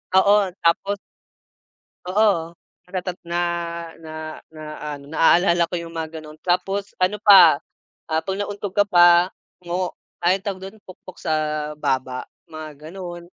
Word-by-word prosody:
Oo 200 +2 +6 0.3
tapos 195 +4 +2 1.1
oo 185 -3 +2 0.4
natata 180 -1 -3
na, 170 +1 -1 0.6
na, 155 - -9 0.4
na, 155 - -10 0.2
na-ano 145 -2 -6
na-aalala 170 +2 +4
ko - - -1
yung 165 0 -9
mga 160 0 -5
ganon, 155 0 -12
tapos 195 +3 -1
ano 195 +3 +2
pa, 195 -8 +8 0.5
ah, 160 0 +2
pag 195 0 -3
nauntog 205 -1 -4
ka 205 - +5
pa, 175 -1 +6 0.3
mo 180 +1 -2 0.3
ay 180 +3 +3
tawag 195 -3 -4
dun 220 - -19
pukpok 185 0 -13
sa 160 - -2 0.5
baba, 130 -2 -2 0.2
mga 155 -1 -10
ganon. 175 -2 -7
175 Hz, 135 wpm, -22 LUFS, 160-195 Hz, 1.1 s, pa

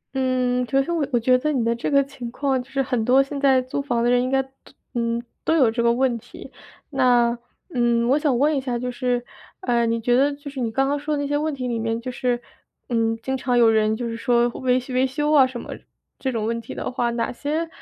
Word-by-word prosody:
嗯， 255 -1 +1
其实 270 +5 +1
我， 330 -3 0
我 240 - +2
觉 255 +2 +3
得 305 +4 0
你 250 -6 0
的 230 - +1
这 235 - -3
个 280 -1 +4
情 250 -3 -8
况 265 +1 -1
就 250 - -15
是 270 0 0
很 250 -4 -1
多 260 +3 +5
现 280 +1 -6
在 270 -2 +5
租 260 +2 -3
房 240 -4 -1
的 240 - +3
人 245 0 +4
应 255 - -1
该 270 0 +2
都 265 - -20 0.4
嗯， 235 0 -1 0.2
都 320 - +2
有 255 -8 +4
这 235 +1 -1
个 235 - +4
问 250 0 +1
题。 - - -12 0.4
那， 245 -3 +3 0.4
嗯， 235 -1 +2
我 275 +4 +3
想 285 -5 +1
问 295 +3 +3
一 270 - 0
下 250 -2 -2
就 250 +1 -3
是， 245 0 -1 0.4
呃， 235 -8 +1
你 230 0 0
觉 240 +2 +2
得 280 +3 +3
就 285 0 -9
是 270 - -7
你 230 -2 -1
刚 270 +3 +1
刚 285 +1 0
说 300 +1 -2
的 285 - -1
那 280 - -2
些 290 - -1
问 305 +2 0
题 255 -1 -4
里 235 -2 -2
面， 225 0 -1
就 255 +2 -5
是， 245 -1 -1 0.5
嗯， 225 -1 +1
经 265 +1 -1
常 255 -1 0
有 235 -1 +6
人 215 0 +2
就 240 +1 -4
是 230 - -4
说 240 0 +2
维 255 +1 0
维 255 +1 +2
修 295 +3 -1
啊 270 -3 +6
什 255 -2 -7
么， - - -9 0.5
这 265 - -1
种 225 -3 -2
问 230 +1 -2
题 225 - -9
的 - - -4
话， 240 -1 0
哪 235 -1 -2
些 305 +6 -2
250 Hz, 280 characters per minute, -23 LUFS, 235-270 Hz, 0.5 s, 有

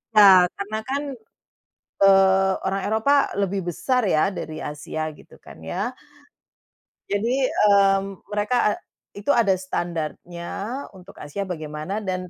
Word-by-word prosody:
Nah, 195 -3 +9 0.2
karena 205 +2 -3
kan, 280 +2 -1 1.0
eee, 195 -1 +5
orang 195 +1 -1
Eropa 220 +6 +2 0.2
lebih 200 -1 0
besar 250 - 0
ya 160 +4 +2
dari 160 -4 -6
Asia, 155 +1 -4
gitu 150 - -17
kan, - - -15
ya. 195 - -3 1.2
Jadi, 240 +6 +1
mmm, 195 -2 +3
mereka, 210 +4 0
e - - +2 0.5
itu 210 - -6
ada 220 -5 +4
standarnya 175 -1 -5 0.5
untuk 190 +1 -15
Asia 150 +7 -5
bagaimana 155 +3 -5
dan 185 -2 -4
195 Hz, 120 wpm, -23 LUFS, 175-205 Hz, 1.2 s, Nah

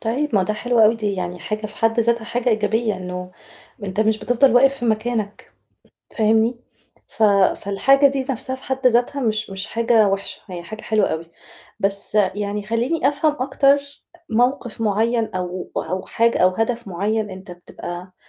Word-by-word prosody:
طيب، 245 +4 -1
ما 195 - +4
ده 215 - -1
حلو 245 +2 -1
أوي، 220 +1 +6
دي 210 -2 -2
يعني 180 -1 -4
حاجة 215 +5 -4
في 210 - -12
حد 225 +1 +2
ذاتها 235 0 +1
حاجة 235 +2 -1
إيجابية، 215 -1 +1
إنه 180 0 -6 0.5
أنت 190 +2 -2
مش 220 0 +2
بتفضل 245 +4 +3
واقف 270 +2 +5
في 240 - -4
مكانك، 220 -2 -2 0.7
فاهمني، 225 +2 +2 0.5
ف 225 - -2 0.3
فالحاجة 270 +8 +3
دي 275 -1 -1
نَفْسها 260 0 -2
في 260 - -16
حد 265 0 +1
ذاتها 245 +4 +1
مش 215 -3 -1
مش 195 0 -4
حاجة 230 -2 +3
وِحشة، 195 0 -3
هي 180 -3 -7
حاجة 215 +5 -8
حلوة 215 -2 +1
أوي. 165 +1 -5 0.5
بس 200 +1 -1
يعني 205 +1 0
خلّيني 240 +8 0
أفهم 295 +2 +1
أكتر 275 +2 +3 0.5
موقف 245 0 0
معيّن 225 +2 +1
أو 180 0 -4
أو 185 +3 -3
حاجة 230 +1 +1
أو 185 - +5
هدف 225 +4 -2
معيّن 205 +4 -1
أنت 185 -1 -10
بتبقى 175 +1 -9
220 Hz, 165 wpm, -21 LUFS, 195-240 Hz, 0.7 s, أوي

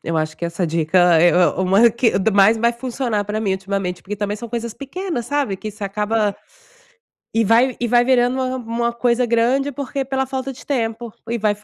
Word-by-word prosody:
Eu 165 - -2
acho 155 0 -2
que - - -5
essa 170 +2 -2
dica 170 +2 +3
é 175 - +6
é 180 0 +4
uma 195 +5 +4
a - - +5
que 235 0 +1
da 200 +3 +1
mais 200 +2 +5
vai 235 +1 +2
funcionar 235 -3 -3
pra 210 +1 -3
mim 200 -3 0
ultimamente, 190 -1 -3
porque 210 - -5
também 205 0 -2
são 235 +1 -8
coisas 235 0 -4
pequenas, 280 - -5
sabe, 280 -8 -1
que 215 - -7
isso 210 0 -11
acaba 210 +1 -1 1.0
e 225 - +2
vai 240 +4 +3
e 240 - -1
vai 240 +1 +4
virando 250 0 +2
uma 260 0 -1
uma 235 0 -2
coisa 240 +1 +1
grande 240 +5 +1
porque 275 0 -4
pela 265 0 -1
falta 265 0 -4
de 250 - -14
tempo 230 -4 -3 0.2
e 235 - -1
vai 215 -1 +1
f 205 0 -17
230 Hz, 220 wpm, -20 LUFS, 200-245 Hz, 1.0 s, é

